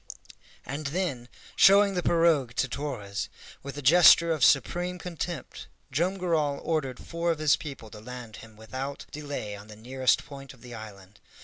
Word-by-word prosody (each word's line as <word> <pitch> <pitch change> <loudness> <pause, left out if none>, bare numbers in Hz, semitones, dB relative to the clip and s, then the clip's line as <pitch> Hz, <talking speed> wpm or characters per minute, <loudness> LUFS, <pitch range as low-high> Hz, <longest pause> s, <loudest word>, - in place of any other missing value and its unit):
And 145 +2 -4
then, 140 -7 -3 0.3
showing 200 +1 +6
the 180 - -1
pirogue 165 -8 +2
to 130 - +1
Torres, 115 -8 -4 0.3
with 140 0 -8
a 145 - -6
gesture 170 +3 +7
of 155 -5 0
supreme 175 +8 +2
contempt 175 -3 -6 0.2
Joam 180 +6 0
Garral 155 -6 0
ordered 140 -6 -2
four 170 0 -3
of 165 - +1
his 155 -2 +4
people 135 -8 -9
to 105 - -10
land 120 -2 -9
him 110 -1 -13
without 130 +6 -6
delay 145 -8 -5
on 100 +1 -12
the 105 - -11
nearest 130 +4 0
point 135 -2 -11
of 120 - -24
the 120 -1 -10
island. 100 -3 -11
140 Hz, 170 wpm, -27 LUFS, 120-165 Hz, 0.3 s, gesture